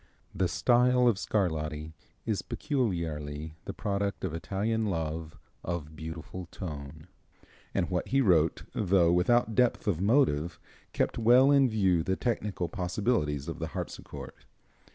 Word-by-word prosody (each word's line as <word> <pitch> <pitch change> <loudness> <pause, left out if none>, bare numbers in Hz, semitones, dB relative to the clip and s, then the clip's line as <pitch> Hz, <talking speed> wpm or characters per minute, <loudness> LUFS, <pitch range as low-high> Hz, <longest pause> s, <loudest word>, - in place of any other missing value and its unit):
The 95 - +1
style 125 +5 +3
of 110 -5 +3
Scarlatti 80 -6 -1 0.3
is 110 -3 0
peculiarly 80 - -2
the - - -4
product 100 -1 -2
of 85 - -3
Italian 105 +6 -1
love 80 -4 -3 0.3
of 80 -3 -4
beautiful 80 +3 -7
tone, 75 -4 -7 0.7
and 85 - +1
what 90 -1 -2
he 135 - +2
wrote, 85 - +3
though 90 -4 +3
without 110 +6 +3
depth 125 +1 +2
of 90 -4 +1
motive, 90 - +2 0.3
kept - - -1
well 125 +4 +6
in 140 -2 +5
view 95 -6 +2
the 95 +3 0
technical 105 -7 -2
possibilities 90 - -1
of - - -5
the - - -2
harpsichord. - - -6
90 Hz, 135 wpm, -29 LUFS, 80-110 Hz, 0.7 s, well